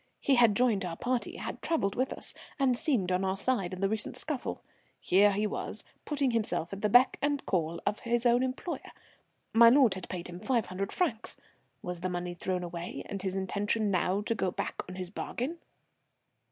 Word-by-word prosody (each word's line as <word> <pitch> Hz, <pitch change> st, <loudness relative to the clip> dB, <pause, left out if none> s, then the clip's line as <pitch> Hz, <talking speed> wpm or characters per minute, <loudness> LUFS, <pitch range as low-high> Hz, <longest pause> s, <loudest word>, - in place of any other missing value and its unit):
He 280 Hz, -, +2 dB
had 235 Hz, -5 st, +5 dB
joined 225 Hz, -4 st, +3 dB
our 170 Hz, -2 st, -4 dB
party, 250 Hz, -1 st, -1 dB
had -, -, -6 dB
travelled 250 Hz, -12 st, 0 dB
with 255 Hz, +1 st, 0 dB
us, -, -, -1 dB, 0.2 s
and 270 Hz, -4 st, +3 dB
seemed 235 Hz, -, 0 dB
on 180 Hz, +1 st, +1 dB
our 190 Hz, 0 st, 0 dB
side 195 Hz, -5 st, +1 dB
in 185 Hz, 0 st, -6 dB
the 195 Hz, -, +3 dB
recent 220 Hz, +1 st, -3 dB
scuffle, 300 Hz, -5 st, -4 dB, 0.4 s
here 200 Hz, +3 st, +5 dB
he 205 Hz, +2 st, 0 dB
was 210 Hz, -, -3 dB, 0.2 s
putting 280 Hz, -4 st, +1 dB
himself 215 Hz, -6 st, -1 dB
at 195 Hz, -, -6 dB
the 210 Hz, -, +2 dB
beck 245 Hz, +4 st, +5 dB
and 285 Hz, -1 st, 0 dB
call 170 Hz, -3 st, 0 dB
of 205 Hz, +1 st, 0 dB
his 240 Hz, 0 st, 0 dB
own 240 Hz, +1 st, +5 dB
employer. 260 Hz, +7 st, -3 dB, 0.6 s
My 230 Hz, +1 st, +9 dB
lord 255 Hz, -4 st, +5 dB
had 185 Hz, -1 st, -7 dB
paid 180 Hz, -1 st, -5 dB
him 175 Hz, 0 st, -8 dB
five 240 Hz, 0 st, +1 dB
hundred 195 Hz, +2 st, -4 dB
francs. 245 Hz, -11 st, -1 dB, 0.5 s
Was 180 Hz, -1 st, -4 dB
the 185 Hz, -, -1 dB
money 175 Hz, 0 st, -3 dB
thrown 180 Hz, +1 st, -2 dB
away, 175 Hz, 0 st, -5 dB
and 195 Hz, -, -5 dB
his 190 Hz, -1 st, -2 dB
intention 205 Hz, +2 st, 0 dB
now 185 Hz, +1 st, +1 dB
to 225 Hz, -, 0 dB
go 195 Hz, -4 st, 0 dB
back -, -, -3 dB
on 185 Hz, -, -7 dB
his 185 Hz, -1 st, -5 dB
bargain? 270 Hz, +10 st, -4 dB
205 Hz, 200 wpm, -30 LUFS, 185-245 Hz, 0.6 s, My